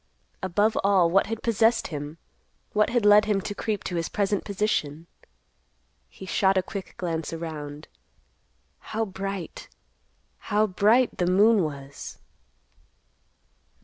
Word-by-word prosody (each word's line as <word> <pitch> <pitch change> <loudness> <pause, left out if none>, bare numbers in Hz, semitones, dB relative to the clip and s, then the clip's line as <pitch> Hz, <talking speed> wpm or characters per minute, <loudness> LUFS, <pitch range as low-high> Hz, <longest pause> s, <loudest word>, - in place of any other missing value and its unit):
Above 205 +4 +1
all, 190 -4 +4
what 195 +2 +3
had 225 +1 -5
possessed 230 0 +2
him—what 160 +7 -4
had 240 -3 +1
led 210 +1 +7
him 210 -2 +1
to 205 +2 -5
creep 210 -1 -3
to 175 - -3
his 165 - -2
present 200 -1 0
position? 175 -7 -2 1.0
He 190 - -11
shot 190 +1 +2
a 185 - +2
quick 195 +1 -7
glance 165 -3 -3
around. 155 -3 -6 0.9
How 225 +1 -3
bright—how 195 +2 -5
bright 215 +6 +2
the 175 - +1
moon 205 +4 +5
was! 140 -3 -6
195 Hz, 115 wpm, -26 LUFS, 170-210 Hz, 1.0 s, led